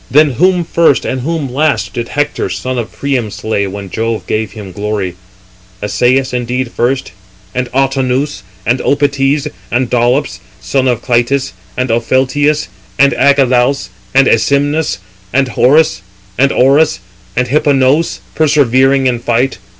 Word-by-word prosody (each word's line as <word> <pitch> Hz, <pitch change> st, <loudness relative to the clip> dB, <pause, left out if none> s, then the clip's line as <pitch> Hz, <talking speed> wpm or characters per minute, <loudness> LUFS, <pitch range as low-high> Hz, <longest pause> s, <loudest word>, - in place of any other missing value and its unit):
Then 150 Hz, +1 st, +4 dB
whom 180 Hz, +7 st, +2 dB
first 165 Hz, -3 st, +2 dB
and 130 Hz, -1 st, -2 dB
whom 150 Hz, -2 st, -3 dB
last, 130 Hz, -10 st, 0 dB
did 120 Hz, +1 st, -3 dB
Hector, 145 Hz, +2 st, -2 dB
son 130 Hz, -1 st, -3 dB
of 115 Hz, -, -5 dB
Priam, 130 Hz, -6 st, -2 dB
slay, 100 Hz, 0 st, -2 dB
when 100 Hz, -1 st, -7 dB
Jove 115 Hz, 0 st, -2 dB
gave 110 Hz, -1 st, -2 dB
him 105 Hz, -4 st, -9 dB
glory? 100 Hz, -2 st, -3 dB, 0.7 s
Assæus 125 Hz, +6 st, +1 dB
indeed 125 Hz, 0 st, -2 dB
first, 130 Hz, 0 st, -1 dB, 0.4 s
and 125 Hz, -1 st, -2 dB
Autonoüs, 135 Hz, -1 st, 0 dB, 0.2 s
and 120 Hz, +2 st, +1 dB
Opites, 140 Hz, 0 st, +1 dB, 0.2 s
and 120 Hz, +1 st, 0 dB
Dolops, 125 Hz, +3 st, +1 dB, 0.2 s
son 130 Hz, +8 st, 0 dB
of 120 Hz, -3 st, 0 dB
Clytis, 125 Hz, -1 st, 0 dB, 0.2 s
and 125 Hz, -1 st, 0 dB
Opheltius, 135 Hz, +6 st, +1 dB, 0.3 s
and 140 Hz, 0 st, +4 dB
Agelaus, 130 Hz, -5 st, +2 dB, 0.3 s
and 135 Hz, 0 st, +6 dB
Æsymnus, 145 Hz, +6 st, +1 dB, 0.3 s
and 135 Hz, -1 st, +1 dB
Orus, 135 Hz, -6 st, +3 dB, 0.4 s
and 125 Hz, -, +1 dB
Hipponoüs, 140 Hz, +2 st, +2 dB
persevering 135 Hz, -3 st, +3 dB
in 125 Hz, -2 st, +1 dB
fight. 120 Hz, -2 st, 0 dB
130 Hz, 125 wpm, -13 LUFS, 120-140 Hz, 0.7 s, and